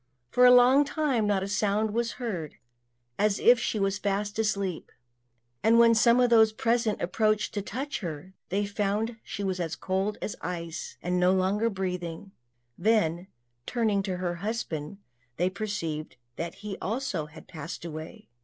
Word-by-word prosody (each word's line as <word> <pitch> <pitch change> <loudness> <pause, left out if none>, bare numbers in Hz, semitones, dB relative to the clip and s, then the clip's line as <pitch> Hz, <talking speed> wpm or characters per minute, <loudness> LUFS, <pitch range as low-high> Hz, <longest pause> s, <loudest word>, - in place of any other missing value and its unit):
For 250 0 +6
a - - +8
long 250 +3 +7
time 280 -7 0
not 200 -2 +1
a - - -3
sound 210 +1 +1
was 235 +1 0
heard, 190 - -5 0.6
as 210 0 +2
if 240 0 +5
she 220 - -1
was 195 -1 0
fast 205 +1 -2
asleep; 200 -5 -1 0.7
and 225 +1 +5
when 230 0 +7
some 235 +2 +5
of 245 -1 +3
those 220 -2 +6
present 230 -1 +1
approached 215 +4 +1
to 205 - -2
touch 265 +8 -4
her, 170 0 -6 0.2
they 200 +2 0
found 210 +3 -1
she 205 - -5
was 190 -1 -1
as 165 -2 -2
cold 190 +4 -1
as - - -4
ice, 170 -1 -5
and 180 +1 0
no 180 +1 +4
longer 190 +4 +2
breathing; 180 -2 -4 0.5
then, 180 -4 +2 0.4
turning 220 -5 +1
to 190 -2 -3
her 175 -1 -2
husband, 195 -7 -3 0.4
they 180 +2 +1
perceived 180 -7 -4 0.2
that 170 0 -5
he 205 -2 -7
also 200 - -2
had 155 +1 -14
passed 165 +1 -7
away. 155 -6 -8
200 Hz, 165 wpm, -28 LUFS, 180-225 Hz, 0.7 s, a